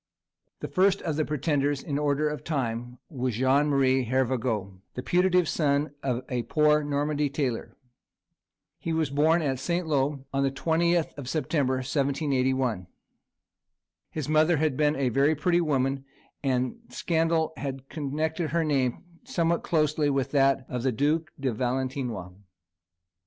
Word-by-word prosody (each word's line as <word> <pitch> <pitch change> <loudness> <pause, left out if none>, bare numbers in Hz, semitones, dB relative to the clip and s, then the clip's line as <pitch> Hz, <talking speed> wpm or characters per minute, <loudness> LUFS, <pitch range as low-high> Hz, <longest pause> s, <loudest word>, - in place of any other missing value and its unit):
The - - -3
first 195 +1 +2
of 160 -3 -1
the 155 - +1
pretenders, 145 -1 0
in 145 -2 -2
order 150 0 +1
of 150 0 -4
time, 120 -4 -3
was 130 -5 -3
Jean 130 +4 +3
Marie 135 -2 +2
Hervagault, 115 -6 -1 0.2
the 125 - -4
putative 180 0 +3
son 145 -1 +1
of 130 -2 -1
a 125 -1 -1
poor 150 +5 +3
Normandy 145 0 0
tailor. 135 -4 -3 1.0
He 165 - -3
was 160 -3 0
born 160 +4 +3
at 135 -3 -1
St. 175 +5 -1
Lô 140 -2 0
on 135 - +1
the 135 - +2
20th 165 +4 +1
of 130 -3 -6
September, 140 -3 0
1781. 130 - 0 1.2
His 155 -4 -4
mother 155 +2 +3
had 155 -2 +1
been 150 +1 +2
a 135 -4 0 0.2
pretty 175 +3 +2
woman, 135 -3 0 0.4
and 130 -2 0
scandal 160 +3 0
had 135 -1 -5
connected 155 +2 -2
her 165 +2 +1
name 135 -5 0 0.2
somewhat 170 -9 0
closely 155 -2 +1
with 135 -1 0
that 135 -2 +3
of 125 -1 -3
the 130 +1 +1
Duke 150 +6 0
de 135 -3 -1
Valentinois. 125 -5 -2
140 Hz, 140 wpm, -27 LUFS, 130-155 Hz, 1.2 s, Jean